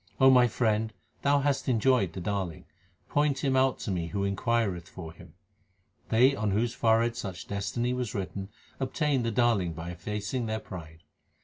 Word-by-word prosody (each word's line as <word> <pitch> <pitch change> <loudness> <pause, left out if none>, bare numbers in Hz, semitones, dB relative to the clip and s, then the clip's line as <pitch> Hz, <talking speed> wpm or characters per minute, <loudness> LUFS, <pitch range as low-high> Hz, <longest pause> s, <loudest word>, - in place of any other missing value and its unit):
O 135 0 +7
my 125 -1 +6
friend, 110 -1 0 0.3
thou 140 0 +3
hast 140 -1 0
enjoyed 120 -5 +3
the - - -5
Darling; 95 -3 -3 0.4
point 145 -2 +1
Him 135 -2 +2
out 130 0 +3
to 105 - -3
me 85 -3 -1
who 100 +3 -2
inquireth 100 -3 0
for 80 -3 -8
Him. 85 - -15 0.7
They 125 +5 +5
on 110 -4 -1
whose 115 +4 +1
forehead 115 +1 +2
such 95 -6 -6
destiny 105 +5 -1
was 125 -3 -3
written, 95 0 -4 0.3
obtain 135 +1 0
the 115 - 0
Darling 115 -7 +2
by 85 +2 -6
effacing 105 +7 -3
their 110 0 -1
pride. 80 -5 -10
110 Hz, 170 wpm, -29 LUFS, 95-125 Hz, 0.7 s, O